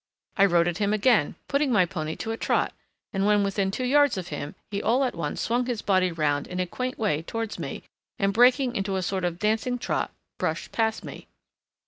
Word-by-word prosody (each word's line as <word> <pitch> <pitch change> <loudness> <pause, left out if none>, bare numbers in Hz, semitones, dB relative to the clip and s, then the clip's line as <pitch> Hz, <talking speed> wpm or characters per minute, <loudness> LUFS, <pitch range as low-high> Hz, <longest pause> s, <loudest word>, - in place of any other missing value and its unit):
I 200 - +5
rode 170 -3 +3
at 175 +2 -2
him 205 0 +1
again, 215 - +3
putting 280 0 +1
my 200 -6 +5
pony 160 -3 -4
to 225 - -4
a - - -1
trot, - - 0 0.4
and 195 0 0
when 205 0 +4
within 195 -1 0
two 225 +6 -3
yards 285 -2 +4
of 180 -2 -5
him 145 0 -5 0.2
he 200 0 -2
all 245 +5 +2
at 255 - 0
once 160 -3 -3
swung 245 +2 0
his 240 -4 -2
body 185 -2 +2
round 145 -3 0
in 180 - -5
a 185 - +1
quaint 255 +8 -4
way 180 -9 0
towards 225 +5 -4
me, - - -5 0.3
and 195 0 +1
breaking 250 +2 +4
into 195 -1 -1
a 190 - -1
sort 190 +1 -2
of 175 -1 -1
dancing 220 +5 0
trot - - -2 0.3
brushed - - -2
past 220 -1 0
me. - - -9
200 Hz, 215 wpm, -26 LUFS, 180-235 Hz, 0.4 s, I